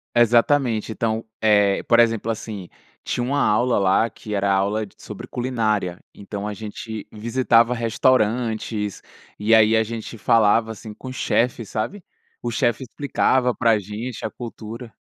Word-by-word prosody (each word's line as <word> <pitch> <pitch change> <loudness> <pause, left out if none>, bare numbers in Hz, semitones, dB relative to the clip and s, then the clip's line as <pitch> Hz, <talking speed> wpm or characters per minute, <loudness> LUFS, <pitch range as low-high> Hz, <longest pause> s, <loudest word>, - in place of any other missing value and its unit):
Exatamente! 120 -1 +3
Então, 110 0 -1 0.2
eh, 105 -2 +3
por 120 0 +4
exemplo, 115 -1 +2
assim, 105 -4 -6 0.3
tinha 120 - -2
uma 140 +3 0
aula 115 +4 +2
lá, 100 +4 +3
que 105 +1 -8
era 100 -1 +1
aula 100 +3 +1
d 95 - -19
sobre - - -9
culinária, 110 -8 -1
então 100 0 -6
a 105 - -3
gente 110 0 -7
visitava 115 +1 +2
restaurantes, 115 -3 0 0.4
e 105 +2 +2
aí, 110 0 +6
a 110 - +4
gente 115 +1 -7
falava, 110 +1 +3
assim, 110 0 -9
com 130 +4 -9
chefes, 120 -3 0
sabe. 175 - -4 0.4
O 120 - -3
chefe 120 +1 0
explicava 130 -1 +1
pra 115 -2 +3
gente 105 +5 -6
a - - -1
cultura. 115 0 -8
110 Hz, 145 wpm, -22 LUFS, 105-120 Hz, 0.4 s, aí